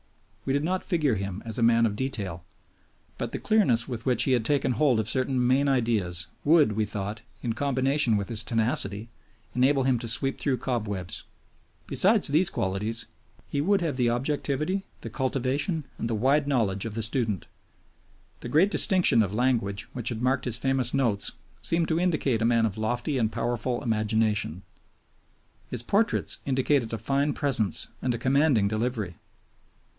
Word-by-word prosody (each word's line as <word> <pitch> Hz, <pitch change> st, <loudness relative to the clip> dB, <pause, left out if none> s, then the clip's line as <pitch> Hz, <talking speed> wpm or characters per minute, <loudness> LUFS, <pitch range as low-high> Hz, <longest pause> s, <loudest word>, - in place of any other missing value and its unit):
We 135 Hz, -, 0 dB
did 140 Hz, +1 st, 0 dB
not 185 Hz, +3 st, -1 dB
figure 155 Hz, -7 st, +1 dB
him 100 Hz, -1 st, -4 dB
as 115 Hz, +2 st, -4 dB
a -, -, +1 dB
man 115 Hz, 0 st, +4 dB
of 105 Hz, -2 st, -1 dB
detail, 105 Hz, -9 st, -4 dB, 0.8 s
but -, -, -3 dB
the -, -, -3 dB
clearness 130 Hz, -, +2 dB
with 120 Hz, -3 st, -5 dB
which 125 Hz, -, +4 dB
he 135 Hz, -, +1 dB
had 120 Hz, -3 st, +2 dB
taken 135 Hz, +1 st, +1 dB
hold 130 Hz, -4 st, +2 dB
of 110 Hz, -, -1 dB
certain 130 Hz, +1 st, +1 dB
main 135 Hz, +3 st, +3 dB
ideas 110 Hz, -9 st, 0 dB, 0.2 s
would, 150 Hz, -5 st, +4 dB
we 105 Hz, +1 st, 0 dB
thought, 105 Hz, +1 st, -5 dB, 0.2 s
in 120 Hz, -2 st, -1 dB
combination 135 Hz, -1 st, +1 dB
with 100 Hz, -, -3 dB
his 115 Hz, -2 st, -4 dB
tenacity, 110 Hz, -1 st, -1 dB, 0.4 s
enable 135 Hz, +2 st, +2 dB
him 130 Hz, -2 st, +1 dB
to 115 Hz, -, -5 dB
sweep 125 Hz, +4 st, -1 dB
through 135 Hz, -3 st, 0 dB
cobwebs. 105 Hz, -8 st, -4 dB, 0.6 s
Besides 210 Hz, +2 st, +4 dB
these 165 Hz, +6 st, +3 dB
qualities 105 Hz, -, -2 dB, 0.4 s
he 140 Hz, -, -2 dB
would 195 Hz, +5 st, +2 dB
have 165 Hz, -5 st, -1 dB
the 125 Hz, -2 st, +1 dB
objectivity, 145 Hz, +8 st, -1 dB, 0.2 s
the 115 Hz, -, -7 dB
cultivation, 135 Hz, -, -1 dB
and 115 Hz, -, -2 dB
the 115 Hz, -, 0 dB
wide 140 Hz, +6 st, +2 dB
knowledge 110 Hz, -7 st, +1 dB
of 110 Hz, -2 st, -5 dB
the 115 Hz, -, +1 dB
student. 110 Hz, -, 0 dB, 0.9 s
The 120 Hz, -, -7 dB
great 170 Hz, +9 st, +3 dB
distinction 185 Hz, -, +4 dB
of 100 Hz, -1 st, -1 dB
language 115 Hz, -5 st, 0 dB
which 120 Hz, -2 st, -2 dB
had 120 Hz, -1 st, -4 dB
marked 130 Hz, +1 st, +1 dB
his 120 Hz, -2 st, +1 dB
famous 130 Hz, -1 st, +1 dB
Notes 115 Hz, -7 st, +1 dB, 0.3 s
seemed 165 Hz, 0 st, 0 dB
to 160 Hz, 0 st, +1 dB
indicate 155 Hz, -10 st, 0 dB
a -, -, +2 dB
man 115 Hz, -1 st, +3 dB
of 110 Hz, -1 st, -3 dB
lofty 120 Hz, +5 st, -1 dB
and 110 Hz, -2 st, 0 dB
powerful 120 Hz, +2 st, -2 dB
imagination. 110 Hz, -, 0 dB, 1.1 s
His 120 Hz, -2 st, -2 dB
portraits 210 Hz, -, +1 dB
indicated 130 Hz, -2 st, +1 dB
a 115 Hz, -, -2 dB
fine 140 Hz, +6 st, 0 dB
presence 125 Hz, -, 0 dB
and 125 Hz, -2 st, 0 dB
a -, -, -3 dB
commanding 130 Hz, -3 st, +2 dB
delivery. 110 Hz, -4 st, -2 dB
120 Hz, 170 wpm, -26 LUFS, 110-140 Hz, 1.1 s, man